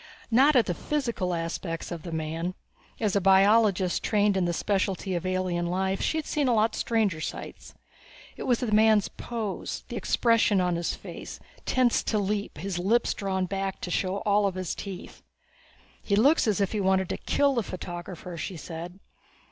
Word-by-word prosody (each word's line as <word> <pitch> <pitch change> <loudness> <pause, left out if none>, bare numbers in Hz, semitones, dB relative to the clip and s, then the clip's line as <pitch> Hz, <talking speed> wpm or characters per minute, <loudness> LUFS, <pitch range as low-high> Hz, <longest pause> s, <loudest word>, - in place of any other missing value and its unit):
Not 275 +6 +5
at 245 - +5
the 175 - -1
physical 235 - -2
aspects 165 0 -4
of 170 -2 -5
the 170 - -7
man; 165 +3 -3 0.4
as 210 -3 0
a 200 - +3
biologist 195 -1 +4
trained 205 -2 +2
in 190 -2 +1
the 175 - +1
specialty 195 +1 -1
of 175 +1 -2
alien 185 -2 -1
life 190 +2 -1
she 320 - 0
had 310 - -2
seen 290 -3 0
a 245 - +3
lot 220 +1 +2
stranger 210 -8 0
sights. - - -7 0.6
It - - -6
was 245 -1 +2
the 240 -4 -1
man's 215 -1 +4
pose, 225 -5 -5
the - - -5
expression 230 -4 +3
on 180 -1 +1
his 170 0 -2
face - - -9 0.3
tensed 255 -2 +2
to 215 - +1
leap, 205 -2 -2
his 180 +2 -3
lips 225 +7 +2
drawn 190 -2 -1
back 195 +1 -3
to 180 - -4
show 190 +3 -1
all 205 0 +3
of 190 - -3
this 185 -2 -3
teeth. 195 -3 -8 0.8
"He 200 - 0
looks 270 +6 +4
as 210 -2 +1
if 200 -2 +1
he 215 - -1
wanted 190 -1 +2
to - - -2
kill 285 -1 +2
the 240 - +1
photographer," 175 -2 -7
she 180 +2 -5
said. 170 +4 -8
195 Hz, 185 wpm, -27 LUFS, 180-220 Hz, 0.8 s, Not